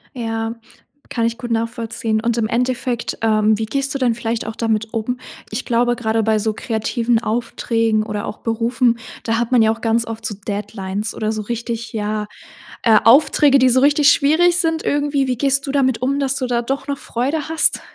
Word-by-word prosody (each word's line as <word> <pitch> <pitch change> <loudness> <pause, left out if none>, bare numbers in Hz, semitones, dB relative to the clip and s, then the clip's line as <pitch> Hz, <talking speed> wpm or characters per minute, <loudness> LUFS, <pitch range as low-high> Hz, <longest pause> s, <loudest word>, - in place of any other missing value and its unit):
Ja, 225 -1 -3 0.5
kann 230 -2 -1
ich 230 0 -1
gut 240 -1 -6
nachvollziehen 230 -1 -1
und 235 +1 0
im 220 -2 +1
Endeffekt, 245 0 -1
ähm, 215 -1 +3
wie 220 - -2
gehst 275 +4 -2
du 275 - -1
denn 245 -2 +2
vielleicht 230 0 -3
auch 220 0 -5
damit 220 -1 -1
um? 240 +3 -2 0.3
Ich 220 +4 -3
glaube, 240 0 +1
grade 225 -2 0
bei 220 0 +2
so 215 0 -1
kreativen 230 +1 0
Aufträgen 225 -1 0
oder 210 0 -4
auch - - -6
Berufen, 230 +1 +1 0.2
da 225 0 0
hat 240 0 -1
man 240 - +6
ja 220 - +4
auch 225 - -4
ganz 230 0 +1
oft 225 0 -7
so 210 - -3
Deadlines 205 0 -4
oder 215 0 -1
so 215 -1 -3
richtig, 235 0 -4
ja 210 0 -2 0.5
äh, 220 -2 +5
Aufträge, 275 +3 +5
die 260 0 +5
so 255 +1 +3
richtig 290 0 +5
schwierig 335 +5 +3
sind 325 -2 0
irgendwie. 285 -1 0
Wie 250 -2 -1
gehst 275 0 +1
du - - -1
damit 260 -4 +1
um, 275 +2 0
dass 275 -1 0
du 255 - -2
da 240 -1 0
doch 270 +4 -3
noch 280 -1 -2
Freude 280 +7 -2
hast? 320 - +2
230 Hz, 200 wpm, -19 LUFS, 220-260 Hz, 0.5 s, man